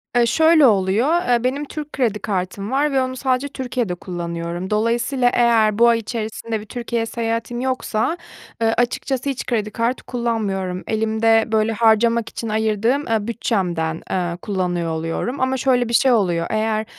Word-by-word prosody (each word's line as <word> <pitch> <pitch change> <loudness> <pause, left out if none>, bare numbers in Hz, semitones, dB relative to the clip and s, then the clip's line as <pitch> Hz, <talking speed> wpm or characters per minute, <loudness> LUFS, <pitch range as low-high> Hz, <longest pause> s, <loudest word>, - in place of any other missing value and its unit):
Eee, 240 -1 +5
şöyle 320 +4 +5
oluyor, 220 - +3
eee, 240 -1 +2
benim 275 +4 -1
Türk 300 0 -7
kredi 230 -6 0
kartım 195 +1 -3
var 290 +2 +1
ve 270 -1 +2
onu 255 0 -2
sadece 260 +1 0
Türkiye'de 250 -8 -3
kullanıyorum. 175 0 -5
Dolayısıyla 235 +4 +1
eğer 225 -3 +3
bu 235 - +7
ay 230 -1 +4
içerisinde 225 0 -4
bir 210 - -10
Türkiye 235 0 -3
seyahatim 230 +1 -3
yoksa, 255 +3 -1 0.4
eee, 225 0 +3
açıkçası 255 +3 -1
hiç 265 -3 -4
kredi 215 -3 -1
kartı 235 +3 -1
kullanmıyorum. 205 -7 -2
Elimde, 225 0 +2
böyle, 220 0 +2
harcamak 230 +1 +3
için 230 - -5
ayırdığım, 220 +6 +1
eee, 220 -2 0
bütçemden, 175 -8 -1
eee, 175 -2 -1
kullanıyor 180 -4 -2
oluyorum. 165 - -3
Ama 260 0 +1
şöyle 250 -2 +1
bir - - -3
şey 260 +3 +4
oluyor, 175 -7 +1
eğer, 220 0 0
225 Hz, 160 wpm, -20 LUFS, 205-250 Hz, 0.4 s, bu